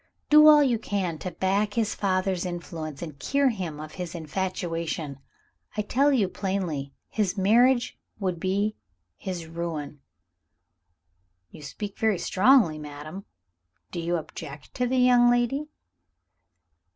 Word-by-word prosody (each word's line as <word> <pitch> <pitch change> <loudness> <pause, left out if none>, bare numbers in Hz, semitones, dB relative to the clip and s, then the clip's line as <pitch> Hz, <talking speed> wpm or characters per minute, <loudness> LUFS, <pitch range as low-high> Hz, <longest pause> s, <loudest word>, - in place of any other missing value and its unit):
Do 305 0 +9
all 300 -1 +8
you 245 -5 +1
can 190 -7 -2
to 185 - -4
back 195 +4 0
his 220 -2 +1
father's 185 -2 0
influence, 170 -4 -6
and 150 -4 -8
cure 275 - +2
him 180 -10 -4
of 155 0 -8
his 175 0 -6
infatuation. 165 -3 -3 0.6
I 210 - +1
tell 275 +7 +2
you 230 -8 +3
plainly, 180 -8 -3 0.2
his 205 -3 -1
marriage 240 +6 +3 0.2
would 185 -4 -2
be 200 +4 0 0.4
his 180 -3 -5
ruin!" 160 -3 -5 1.5
"You - - -12
speak 200 +8 -7
very 220 -3 +2
strongly, 190 - +4
madam. 150 +6 -8 0.7
Do 175 - -4
you 170 +1 -1
object 150 -3 -7
to 250 - 0
the 260 +1 0
young 245 -1 +6
lady?" 245 +5 +1
190 Hz, 130 wpm, -26 LUFS, 165-225 Hz, 1.5 s, Do